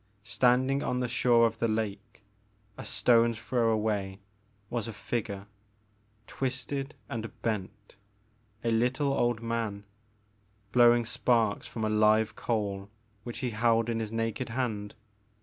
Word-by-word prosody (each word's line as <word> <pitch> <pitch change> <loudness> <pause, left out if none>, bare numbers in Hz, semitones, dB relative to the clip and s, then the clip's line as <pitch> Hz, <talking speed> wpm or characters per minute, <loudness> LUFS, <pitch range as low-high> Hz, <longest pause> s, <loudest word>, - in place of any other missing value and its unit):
Standing 130 +5 +2
on 125 - -1
the 125 - 0
shore 120 -1 +4
of 115 -1 -1
the 115 - +2
lake, 110 -1 -3 0.5
a - - -8
stone's 115 -1 +3
throw 120 -1 +1
away, 105 -3 0 0.5
was 115 0 -3
a 115 - -5
figure, 105 -2 -4 0.8
twisted 135 +3 -3
and 115 -1 -4
bent, 105 -2 -4 0.3
— 110 -1 -37
a 115 - +1
little 125 +5 +1
old 120 -3 0
man, 115 -3 -2 0.9
blowing 120 -1 +5
sparks 115 -2 +1
from 110 -2 -3
a - - +1
live 110 +1 +3
coal 100 -3 -2 0.3
which 120 0 -6
he 125 - -1
held 115 +1 +2
in 115 -1 -1
his 110 -1 -3
naked 115 +2 -2
hand. 110 -4 -3
115 Hz, 135 wpm, -29 LUFS, 110-120 Hz, 0.9 s, blowing